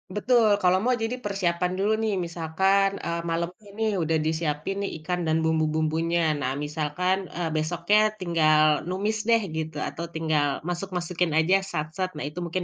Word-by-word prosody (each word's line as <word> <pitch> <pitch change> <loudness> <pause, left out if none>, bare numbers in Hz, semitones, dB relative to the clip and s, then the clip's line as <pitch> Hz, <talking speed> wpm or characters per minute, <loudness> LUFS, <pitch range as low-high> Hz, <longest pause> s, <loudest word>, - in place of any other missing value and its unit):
betul. 235 +1 +3 0.2
Kalau 185 +1 +4
mau 250 0 +3
jadi 235 +3 -1
persiapan 180 -5 -1
dulu 210 +2 +2
nih, 210 -3 +1
misalkan, 190 +4 +2
eee, 170 0 -2
malemnya 170 +5 -4
nih 220 -1 +1
udah 160 0 +1
disiapin 160 +2 -1
nih 200 - -2
ikan 180 +1 -1
dan 160 +1 +1
bumbu-bumbunya. 160 +1 +1
Nah, 130 -1 -1
misalkan, 155 +6 -1
eee, 170 -1 -1
besoknya 170 +6 +2 0.2
tinggal 160 -4 +3 0.3
numis 205 +4 -1
deh 230 -1 +5 0.2
gitu, 160 -1 -4
atau 170 - -6
tinggal 150 -3 0
masuk-masukin 175 -1 -2
aja, 175 +5 +4
sat, 155 -2 -2
set. 185 -1 -1
Nah, 150 - -5
itu 150 +4 -5
mungkin 180 +2 -2
170 Hz, 160 wpm, -26 LUFS, 160-190 Hz, 0.3 s, deh